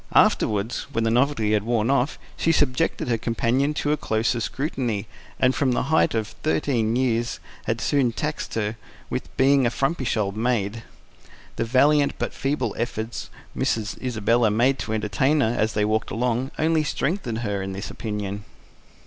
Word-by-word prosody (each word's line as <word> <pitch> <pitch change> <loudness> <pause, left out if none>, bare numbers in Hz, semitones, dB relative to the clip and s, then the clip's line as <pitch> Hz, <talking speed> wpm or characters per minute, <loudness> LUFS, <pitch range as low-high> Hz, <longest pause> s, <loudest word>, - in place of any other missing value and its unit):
Afterwards, 105 +2 +2
when 115 - +1
the 115 - +2
novelty 120 -3 +2
had 105 - +3
worn 115 +2 +1
off, 140 +1 +1 0.2
she 165 - +2
subjected 145 -1 +1
her 115 -2 +1
companion 120 +6 +1
to 145 - 0
a 150 - +2
closer 115 -1 0
scrutiny, 120 -4 -2 0.3
and 130 0 +4
from 130 -3 +1
the - - +1
height 160 - +3
of 110 -1 -1
thirteen 120 -7 +1
years 120 -2 0 0.3
had - - -1
soon 135 -4 +2
taxed 150 +6 -4
her 110 0 -1 0.3
with - - -5
being 135 -1 +4
a - - +2
frumpish 135 0 -1
old 100 -2 -1
maid; 115 -1 0 0.7
the 115 - -1
valiant 140 +4 +4
but - - -3
feeble 140 +2 -1
efforts 115 -1 -3 0.2
Miss - - +1 0.2
Isabella 115 -1 +2
made 125 +6 +2
to 105 +2 -3
entertain 110 +8 +1
her, 115 -1 +1
as 110 -1 +1
they 105 0 +1
walked 110 +1 0
along, 125 +2 0
only 160 0 +2
strengthening 135 - -2
her 100 -2 -1
in 95 0 -4
this 100 +2 -5
opinion. 105 -2 -4
120 Hz, 165 wpm, -24 LUFS, 110-135 Hz, 0.7 s, and